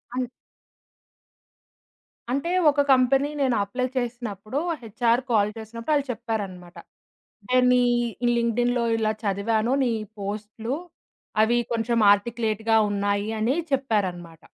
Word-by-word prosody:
అన్ 250 -1 -2 2.0
అంటే, 280 +7 -1 0.2
ఒక 290 0 +2
కంపెనీ 270 +2 +3
నేను 260 -3 +2
అప్లై 250 +6 -2
చేసినప్పుడు, 240 -1 -3 0.2
హెచ్‌అర్ 230 +2 +1
కాల్ 210 -2 +3
చేసినప్పుడు, 230 +6 -4
ఆళ్ళు 285 -1 +1
చెప్పారన్నమాట. 195 -7 -5 0.7
"నేనీ 250 0 +4 0.6
లింక్‌డిన్‌లో 240 +1 +1
ఇలా 215 -1 +1
చదివాను, 215 +4 0
నీ 245 - +1 0.3
పోస్ట్‌లు, 215 +4 -4 0.7
అవి 240 +2 +2
కొంచెం 230 0 0
ఆర్టిక్యులేట్‌గా 225 +1 +1
ఉన్నాయి" 205 +1 -1
అని 235 +5 +1 0.2
చెప్పారన్నమాట. 190 - -1
230 Hz, 100 wpm, -25 LUFS, 205-250 Hz, 2.0 s, నేనీ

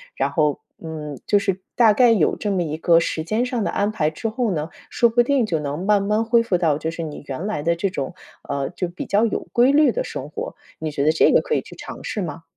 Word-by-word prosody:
然 - - 0
后， 150 -3 +1 0.2
嗯， 150 -4 -6
就 205 - +4
是 195 -2 -2
大 225 -3 +6
概 245 +2 +5
有 200 -9 +3
这 205 - -2
么 185 -3 +1
一 155 -1 -4
个 165 0 +4
时 165 -1 -2
间 215 +8 0
上 245 -3 -2
的 - - -1
安 205 +1 0
排 155 -8 0
之 155 +8 -4
后 230 -1 -1
呢， 155 -2 -2 0.2
说 235 - +3
不 235 +2 +3
定 265 -1 +2
就 170 -7 -1
能 150 +4 -4
慢 205 -1 +4
慢 210 +3 +1
恢 235 +1 +4
复 205 -6 +1
到， 160 -4 +2
就 160 - -2
是 165 0 -5
你 150 -2 -7
原 140 +7 -4
来 150 -8 -2
的 170 +1 +2
这 195 +4 -1
种， 135 -6 -4 0.3
呃， 140 -1 -1
就 180 0 -3
比 175 - -6
较 205 +2 +2
有 225 - -1
规 245 +3 +5
律 300 +1 +5
的 - - -2
生 - - -6
活， 475 +3 -6 0.2
你 155 -1 -3
觉 140 -1 -1
得 155 - +5
这 160 - +4
个 - - +5
可 460 - -1
以 - - +1
去 - - -13
尝 - - -9
试 210 - -3
吗？ 165 -2 -5
185 Hz, 285 characters per minute, -22 LUFS, 155-225 Hz, 0.3 s, 大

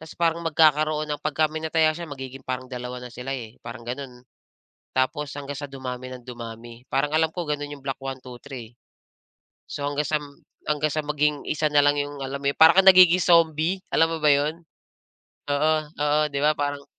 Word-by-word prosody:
Ta's 160 -1 -12
parang 170 0 +1
magkakaroon 155 -1 +3
ng 145 - -4
pagka 155 +1 0
may 160 - -4
nataya 160 0 +2
siya, 170 +1 -7
magiging 135 -2 -8
parang 130 0 -5
2 125 0 -5
na 125 - -10
sila, 135 +3 -5
eh, 115 -3 -10
parang 120 0 -9
gano'n. 125 0 -7 0.7
Tapos 140 +3 -1
hanggang 145 0 -6
sa 140 0 -7
dumami 130 -1 -6
nang 125 -2 -10
dumami. 115 0 -9
Parang 145 +3 +1
alam 160 0 +2
ko 175 -2 -5
gano'n 145 -1 -3
yung 145 -1 -9
block 135 -1 -3
1-2-3. 130 -2 -8 0.9
So, 145 - -6
hanggang 145 0 -1
sam 150 -1 0 0.4
hanggang 150 0 0
sa 155 -1 -1
maging 150 0 0
1 155 0 +1
na 145 -1 +4
lang 145 0 +3
yung 145 -1 -4
alam 135 +1 -4
mo 140 - -2
yun, - - -15
para 160 +1 +8
kang 190 0 +6
nagiging 185 -1 +8
zombie, 170 +2 +3
alam 165 - +4
mo 165 0 -3
ba 150 - +5
yun? 150 +4 0 0.9
Oo, 150 +2 +2 0.2
oo, 150 +1 +2
‘di 140 - -1
ba 150 - +5
parang 145 -1 -3
145 Hz, 195 wpm, -24 LUFS, 130-155 Hz, 0.9 s, para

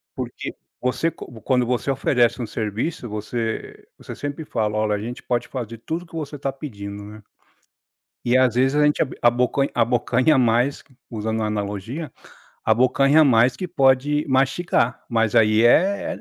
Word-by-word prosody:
porque, - - -5 0.3
você 125 +6 0
co 115 -3 -12
quando 125 -2 +1
você 125 +2 -1
oferece 125 -2 +1
um 115 - -3
serviço, 115 +6 -3
você 110 +2 -5
você - - -9
sempre 145 +2 -5
fala: 110 -4 -1
"Olha, 110 -1 +1
a - - -4
gente 120 +3 -7
pode 120 -1 -1
fazer 115 -3 -6
tudo 160 +8 -4
o - - -15
que - - -25
você 150 -2 -5
tá 140 0 -2
pedindo", 100 -8 -8
né. 105 0 -12 1.0
E, 120 +1 +3
às 130 -3 +3
vezes, 130 +3 +2
a 150 - +4
gente 150 - +2
ab 135 - -3
abocan 125 +3 +2
abocanha 125 +4 +2
mais, 125 +3 +2 0.3
usando 110 0 -2
a - - 0
analogia, 105 - -4 0.5
abocanha 135 +5 +4
mais, 120 -1 +4
que 185 - -4
pode 145 -2 +2
mastigar. 135 -1 +1
Mas, 115 -3 +1
aí, 110 0 +4
é 190 +11 +3
125 Hz, 165 wpm, -22 LUFS, 110-140 Hz, 1.0 s, a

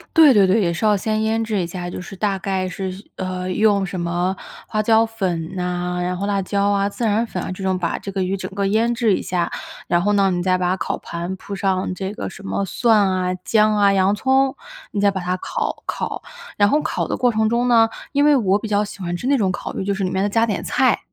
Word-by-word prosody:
对， 315 -4 +8
对， 200 -4 +5
对， 190 +4 +3
也 170 -3 +1
是 170 - -5
要 210 -1 +4
先 215 +2 -1
腌 220 +1 +1
制 215 -3 -1
一 170 - -2
下， 175 0 -5
就 175 - -6
是 190 - -9
大 195 0 -1
概 190 -1 -1
是， 185 +1 -4 0.3
呃， 185 0 -3
用 200 0 +3
什 185 0 -5
么 175 +2 -1 0.3
花 215 - 0
椒 225 +1 +4
粉 185 -7 -3
呐， 180 0 -2
然 180 0 -2
后 195 - -2
辣 200 -1 0
椒 200 +1 0
啊， 200 0 +1
孜 230 +3 -3
然 220 +2 +2
粉 180 - -4
啊， - - -4
这 185 +1 -6
种， 190 -1 +1
把 170 -2 -2
这 200 - -6
个 195 -1 -1
鱼 185 +2 -1
整 195 - -5
个 200 -1 0
腌 225 +4 +2
制 225 -5 +2
一 - - -3
下。 175 -2 -1 0.4
然 175 - +2
后 205 +3 +1
呢， 195 -1 +3
你 175 -1 -1
再 185 0 +2
把 180 0 +1
烤 165 - -2
盘 175 +2 -5
铺 200 +1 -7
上 190 -1 0
这 190 +2 -4
个 - - -5
什 210 - -12
么 195 0 -2
蒜 225 +4 +3
啊、 185 -1 0
姜 215 -1 +3
啊、 200 -1 +4
洋 195 +1 +3
葱， 265 +3 +2 0.4
你 205 - -2
再 200 0 +4
把 190 -1 -4
它 180 +1 -1
烤 - - -3
烤， - - -4 0.3
然 205 - +5
后 295 +5 +3
烤 - - -2
的 - - -1
过 245 -1 +2
程 220 -1 +1
中 235 +2 +1
呢， 230 -2 +5 0.2
因 285 0 +3
为 295 -1 +6
我 200 -6 +3
比 215 - -6
较 205 0 +2
喜 205 -1 -8
欢 175 -2 -3
吃 245 - -4
那 280 0 +3
种 195 -6 +1
烤 - - -5
鱼， - - -3
就 200 - 0
是 195 0 -3
里 185 - 0
面 190 +1 0
要 205 - +1
加 225 +2 +2
点 210 - -2
菜。 - - +2
195 Hz, 280 characters per minute, -21 LUFS, 185-215 Hz, 0.4 s, 对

